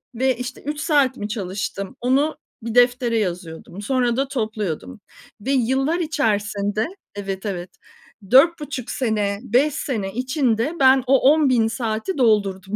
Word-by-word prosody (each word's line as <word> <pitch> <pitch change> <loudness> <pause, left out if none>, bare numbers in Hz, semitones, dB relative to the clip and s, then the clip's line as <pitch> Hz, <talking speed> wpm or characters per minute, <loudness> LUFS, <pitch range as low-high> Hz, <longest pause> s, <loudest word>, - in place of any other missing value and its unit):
ve, 260 0 +1
işte, 250 0 -6
3 295 +1 -4
saat 285 -5 +2
mi 205 +1 -5
çalıştım 195 -1 -4
onu 275 +5 +1 0.3
bir 230 0 -4
deftere 245 -1 +3
yazıyordum. 180 -1 -5
Sonra 245 0 0
da 275 - +1
topluyordum 215 - -4 0.4
ve 265 +6 -2
yıllar 270 +6 +1
içerisinde 215 - -1 0.3
Evet, 195 0 -5
evet. 180 -3 -4 0.6
4,5 290 -3 +3
sene, 210 -5 -1
5 260 +5 +2
sene 205 -8 -3
içinde 255 +2 0
ben 265 -1 +5
o 270 +1 +5
10.000 255 -8 +3
saati 225 - -3
doldurdum. 200 -5 +1
240 Hz, 130 wpm, -22 LUFS, 205-270 Hz, 0.6 s, ben